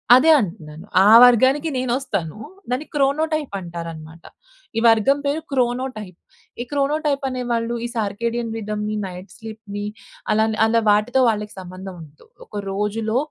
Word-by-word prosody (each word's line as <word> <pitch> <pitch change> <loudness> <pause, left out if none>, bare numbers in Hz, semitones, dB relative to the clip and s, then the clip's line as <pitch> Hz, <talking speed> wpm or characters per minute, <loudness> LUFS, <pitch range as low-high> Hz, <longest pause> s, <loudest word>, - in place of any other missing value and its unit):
అదే 315 +5 +6
అంటున్నాను. 170 -4 -6 0.2
ఆ - - +7
వర్గానికి 260 +6 +5
నేనొస్తాను. 240 - -2 0.3
దాన్ని 255 +5 -2
క్రోనోటైప్ 295 -1 0
అంటారన్నమాట. 165 -2 -8 0.5
ఈ - - +3
వర్గం 225 +5 +4
పేరు 290 +3 0
క్రోనోటైప్. 245 -7 -2 0.4
ఈ - - -1
క్రోనోటైప్ 285 0 0
అనేవాళ్ళు 240 -2 -2
ఈ - - -1
సార్కేడియన్ 230 +2 -2
రిథమ్‌ని, 210 0 -3
నైట్ 180 +2 -10
స్లీప్‌ని 215 -2 -7 0.5
అలా, 220 +1 +3 0.2
అలా 230 +1 +3
వాటితో 210 +6 +3
వాళ్ళకి 210 -1 -3
సంబంధం 185 +1 -9
ఉండదు. 150 -1 -16 0.2
ఒక - - -14 0.2
రోజులో 215 +3 -1
225 Hz, 125 wpm, -21 LUFS, 200-260 Hz, 0.5 s, ఆ